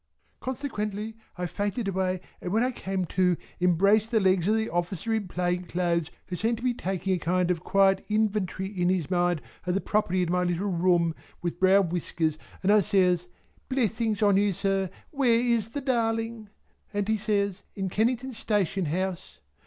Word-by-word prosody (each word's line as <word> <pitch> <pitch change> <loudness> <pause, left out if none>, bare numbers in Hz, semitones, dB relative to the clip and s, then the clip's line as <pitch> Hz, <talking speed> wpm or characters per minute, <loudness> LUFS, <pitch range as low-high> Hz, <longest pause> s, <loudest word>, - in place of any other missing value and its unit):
Consequently 220 -5 -4 0.2
I 180 - -2
fainted 205 +5 -2
away 185 -1 0 0.2
and 180 - -4
when 220 +4 +3
I 255 - +1
came 190 -6 -3
to, 180 0 +2 0.2
embraced 200 +5 +3
the 230 -2 +3
legs 185 -3 +3
of 215 - +4
the 220 0 0
officer 175 +5 -2
in 215 -3 -1
plain 180 0 -1
clothes 170 -2 0 0.2
who 180 - -5
seemed 225 +5 0
to 235 - -10
be 250 -1 +2
taking 190 -3 -2
a 180 - 0
kind 180 +1 +1
of 175 - 0
a - - -24
quiet 195 -1 +3
inventory 210 -3 0
in 185 -3 0
his 185 -2 0
mind 175 -3 +1 0.2
of 180 - +1
the - - +2
property 185 -3 +1
in 170 - -1
my 180 0 +2
little 180 +3 0
room 170 -1 +2 0.3
with 175 0 -3
brown 190 -1 +5
whiskers, 160 -2 -1 0.2
and 195 - +4
I 210 0 +6
says 180 -2 +2 0.4
"Blessings 225 -4 0
on 200 -2 +5
you 200 0 +3
sir 195 0 0 0.2
where 255 -5 +3
is 235 -3 +1
the 285 +5 -4
Darling!" 225 -3 -1 0.4
and 205 -1 -1
he 220 - +2
says 200 -2 0
"In 195 -1 -2
Kennington 245 +6 0
Station 195 -4 0
House." 185 +3 -3
195 Hz, 185 wpm, -27 LUFS, 180-220 Hz, 0.4 s, I